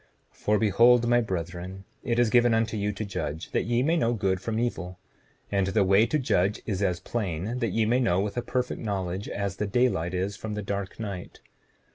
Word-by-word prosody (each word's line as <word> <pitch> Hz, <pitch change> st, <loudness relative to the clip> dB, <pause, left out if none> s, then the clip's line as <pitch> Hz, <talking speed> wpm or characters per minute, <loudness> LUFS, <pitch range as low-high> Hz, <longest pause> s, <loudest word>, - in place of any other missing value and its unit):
7:15 -, -, -30 dB
For 105 Hz, 0 st, +2 dB
behold, 120 Hz, +3 st, +5 dB
my 120 Hz, 0 st, +4 dB
brethren, 90 Hz, -1 st, -5 dB, 0.2 s
it 120 Hz, -1 st, 0 dB
is 120 Hz, -2 st, +3 dB
given 120 Hz, -2 st, +5 dB
unto 115 Hz, 0 st, 0 dB
you 105 Hz, 0 st, 0 dB
to 105 Hz, +2 st, -5 dB
judge, 80 Hz, -5 st, -4 dB
that -, -, 0 dB
ye 120 Hz, +2 st, +1 dB
may 160 Hz, +4 st, +2 dB
know 120 Hz, -8 st, +2 dB
good 95 Hz, -4 st, 0 dB
from 110 Hz, +1 st, -2 dB
evil; 95 Hz, -6 st, -2 dB, 0.5 s
and 100 Hz, -2 st, +1 dB
the 100 Hz, +1 st, +2 dB
way 100 Hz, +4 st, +4 dB
to 155 Hz, -, +1 dB
judge 100 Hz, -7 st, +1 dB
is 100 Hz, -3 st, -2 dB
as 90 Hz, -3 st, +1 dB
plain, 100 Hz, +2 st, -3 dB
that 115 Hz, -3 st, 0 dB
ye 110 Hz, +3 st, +1 dB
may 120 Hz, +3 st, +2 dB
know 105 Hz, -8 st, +2 dB
with 100 Hz, +1 st, -2 dB
a 120 Hz, -, 0 dB
perfect 125 Hz, +1 st, -2 dB
knowledge, 95 Hz, -3 st, -3 dB
as 100 Hz, -1 st, -3 dB
the 105 Hz, -, -1 dB
daylight 100 Hz, -7 st, +1 dB
is 95 Hz, +2 st, -1 dB
from 105 Hz, +1 st, -5 dB
the 105 Hz, -, -4 dB
dark 100 Hz, 0 st, -4 dB
night. 100 Hz, -5 st, -6 dB
105 Hz, 215 wpm, -27 LUFS, 95-120 Hz, 0.5 s, behold